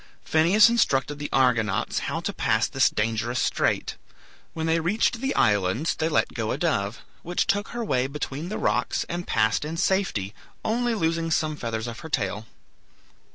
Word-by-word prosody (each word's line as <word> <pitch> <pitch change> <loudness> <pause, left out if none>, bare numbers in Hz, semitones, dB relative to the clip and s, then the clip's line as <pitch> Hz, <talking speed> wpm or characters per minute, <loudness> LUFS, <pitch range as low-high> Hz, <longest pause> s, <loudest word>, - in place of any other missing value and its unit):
Phineus 175 +8 +5
instructed 145 - +1
the 145 - -4
Argonauts 125 -5 +1
how - - -2
to - - -3
pass - - +1
this - - +3
dangerous 115 +2 -1
strait. - - 0 0.6
When 160 -1 -2
they 165 +1 +2
reached 210 +7 0
the 270 0 -1
islands 105 - +2
they 160 0 -1
let 150 - +1
go 110 -2 -3
a - - -1
dove, 115 -10 -1 0.2
which 175 +1 -1
took 205 +1 0
her 240 -1 -4
way 130 -8 +1
between 150 +3 -5
the 215 - -3
rocks, - - 0
and 175 +1 -4
passed 110 +5 +1
in 160 +2 -5
safety, 180 - 0 0.3
only 240 +1 +1
losing 165 -3 0
some 155 -1 0
feathers 115 -4 -4
of 120 -1 -6
her 160 - -9
tail. 105 -2 -2
155 Hz, 170 wpm, -25 LUFS, 115-175 Hz, 0.6 s, Phineus